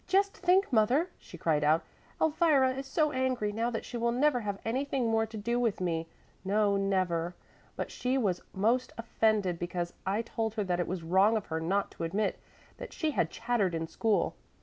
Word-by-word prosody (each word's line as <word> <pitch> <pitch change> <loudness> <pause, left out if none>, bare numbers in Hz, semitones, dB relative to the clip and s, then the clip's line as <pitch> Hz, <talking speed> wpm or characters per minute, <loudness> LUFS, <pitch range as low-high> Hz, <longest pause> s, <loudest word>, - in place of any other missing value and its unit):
"Just 395 +2 +2
think, 370 -2 +2
mother," 250 +10 +3
she 175 - -12
cried 155 -2 +1
out, 155 +2 +3 0.4
"Elvira 300 -5 +3
is 270 +1 -6
so 305 +2 +1
angry 255 -5 0
now 225 +3 -1
that 225 -2 -4
she 245 - -5
will 235 0 +1
never 260 +1 +2
have 205 -3 -3
anything 260 +1 0
more 225 0 +2
to 220 0 -8
do 235 +4 -1
with 230 -4 0
me, 165 -3 -1 0.4
no 200 +1 +2
never. 185 -3 0 0.4
But - - -4
she 255 +2 -1
was 195 -8 0
most 230 +6 +1
offended 215 -6 +1
because 175 0 -3
I 200 +4 0
told 225 -1 -3
her 215 - 0
that 180 -2 -1
it 175 - 0
was 180 -2 -4
wrong 190 +6 +4
of 210 - -4
her; 160 - 0
not 190 +5 0
to - - -7
admit 200 +6 -1 0.4
that - - -8
she 315 -3 -1
had 165 - +1
chattered 225 -6 0
in 165 0 -2
school. 215 +5 0
220 Hz, 195 wpm, -30 LUFS, 185-255 Hz, 0.4 s, wrong